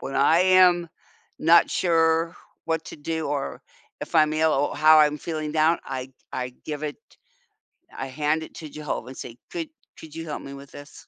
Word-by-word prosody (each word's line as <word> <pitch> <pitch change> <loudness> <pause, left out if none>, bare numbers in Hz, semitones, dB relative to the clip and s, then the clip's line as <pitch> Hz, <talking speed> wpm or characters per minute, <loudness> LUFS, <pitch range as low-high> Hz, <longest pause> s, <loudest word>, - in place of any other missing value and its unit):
when 135 - -6
I 145 +5 +4
am 185 -2 +5 0.5
not 170 +2 +5
sure 165 -1 +2 0.3
what 160 -1 -1
to - - -9
do, 160 +1 -3
or 145 -2 -3 0.4
if - - -8
I'm 155 -1 +4
ill 155 0 +2
or 145 +1 0
how 155 +1 +7
I'm 150 -1 +4
feeling 155 -1 -4
down, 160 +2 +3
I 130 0 -6 0.2
I 125 0 -3
give 150 -1 -5
it 150 - -4 1.0
I 135 - -4
hand 150 +4 -1
it - - -11
to 155 - -8
Jehovah 150 -5 -5
and 130 - -10
say, 120 0 -8
"Could 330 -3 -4 0.3
could 155 -2 -12
you 165 0 -6
help 150 - -5
me 140 - -9
with 140 0 -12
this?" 145 0 -13
155 Hz, 190 wpm, -24 LUFS, 145-165 Hz, 1.0 s, how